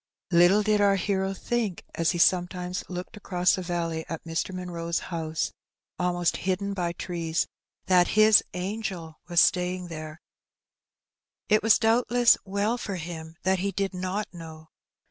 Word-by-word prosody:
Little 175 +4 +5
did 210 0 +2
our 200 -1 +4
hero 195 0 0
think, 220 -4 -2
as 165 -1 +1
he 175 - 0
sometimes 180 +1 +1
looked 180 +4 -6
across 180 -3 +1
the 185 - -1
valley 170 -2 -2
at 165 - -5
Mr. 165 +3 -3
Munroe's 170 -2 -3 0.2
house, 160 -1 -2 0.5
almost 175 -1 0
hidden 195 +2 -2
by 175 -3 -2
trees, 170 -2 -2 0.4
that 180 -1 +4
his 215 0 +8 0.2
^' 180 - -4
angel" 185 -5 -5
was 175 -1 +2
staying 180 -1 +2
there. 155 -1 -7 1.3
It 215 0 +4
was 225 0 +5
doubtless 240 +1 +4
well 205 +5 -1
for 200 -4 -4
him 165 -1 -7
that 190 0 +2
he 200 +2 -1
did 195 0 -2
not 185 +3 -2
know. 160 -2 -11
180 Hz, 150 wpm, -26 LUFS, 170-200 Hz, 1.3 s, his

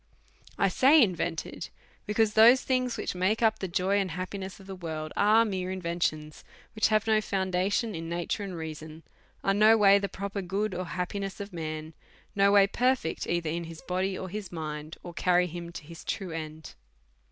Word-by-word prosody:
1 195 - +2
say 280 +9 +6
invented, 175 - -1 0.4
be 210 - -3
cause 220 -1 +3
those 235 +4 +7
things 255 -2 0
which - - -3
make 190 +5 0
up 220 -1 +3
the 190 - -3
joy 185 +3 +1
and 195 -2 -1
happi 185 +4 -5
ness 190 -2 -7
of 195 - -14
this 190 -1 -8
world 155 -2 -5
are 215 +3 +5
mere 185 -3 -3
inventions, 170 -4 -3 0.3
which 215 - +2
have 215 -1 +2
no 220 -1 +3
foundation 195 +3 0
in 165 -1 -5
nature 170 +4 -2
and 190 -3 -5
reason, 160 0 -8 0.4
are 195 - +2
no 215 +2 +6
way 200 -1 +6
the 200 0 -3
pro 200 +1 -5
per 200 0 -4
good 195 +3 -2
or 180 +1 -3
happiness 190 +3 -4
of 200 -1 -7
man, 155 -1 -5 0.4
no 200 0 +4
way 200 -1 +7
perfect 245 -4 0
either 170 -2 -1
in 170 +1 -3
his 165 0 -10
body 185 +1 -1
or 190 - -5
his 200 +1 -6
mind, 155 -2 -6
or 175 - -8
carry 180 +1 +2
him 170 0 -7
to 170 - -8
his 165 +2 -11
true 190 -3 -4
end. 155 -1 -7
185 Hz, 200 wpm, -28 LUFS, 170-205 Hz, 0.4 s, those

